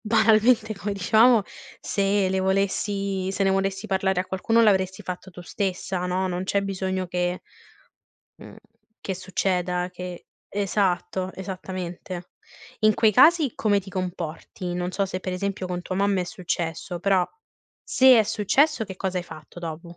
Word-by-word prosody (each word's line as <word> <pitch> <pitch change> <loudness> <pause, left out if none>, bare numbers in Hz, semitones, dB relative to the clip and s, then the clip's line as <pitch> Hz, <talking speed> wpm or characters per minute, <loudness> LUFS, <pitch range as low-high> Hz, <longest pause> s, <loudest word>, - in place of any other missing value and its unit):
banalmente, 220 0 +3
come 205 +1 -3
dicevamo 220 +4 +5 0.4
se 195 -1 +1
le 190 0 0
volessi 195 0 0
se 195 - -1
ne 195 - +3
volessi 195 +1 -1
parlare 190 -2 +1
a 185 - -4
qualcuno 225 +5 +2
l'avresti 190 -3 +2
fatto 185 +1 -6
tu 180 - -11
stessa 185 0 -3
no, 185 +1 0
non 180 +1 -3
c'è 200 +1 +1
bisogno 190 -1 -2
che 180 0 -2 0.9
mhmm, - - -13 0.4
che 190 - -3
succeda 180 -1 -1
che 180 -1 -8 0.2
esatto, 190 -2 -1
esattamente. 185 -1 -6 0.5
In 215 0 +4
quei 220 0 +4
casi 310 - +5
come 205 -2 +2
ti 195 0 -12
comporti? 180 -1 -5
Non 180 0 -2
so, 195 +1 0
se 185 -1 -4
per 185 - -4
esempio 195 0 -3
con 180 -1 -3
tua 185 - -4
mamma 200 -1 +2
è - - -4
successo 175 -2 -4
però 190 -1 +3 0.6
se 260 -2 +6
è - - +4
successo 240 +6 +2
che 190 - -8
cosa 185 -1 -2
hai 175 - -5
fatto 155 0 -12
dopo? 170 +1 -7
190 Hz, 155 wpm, -25 LUFS, 180-200 Hz, 0.9 s, se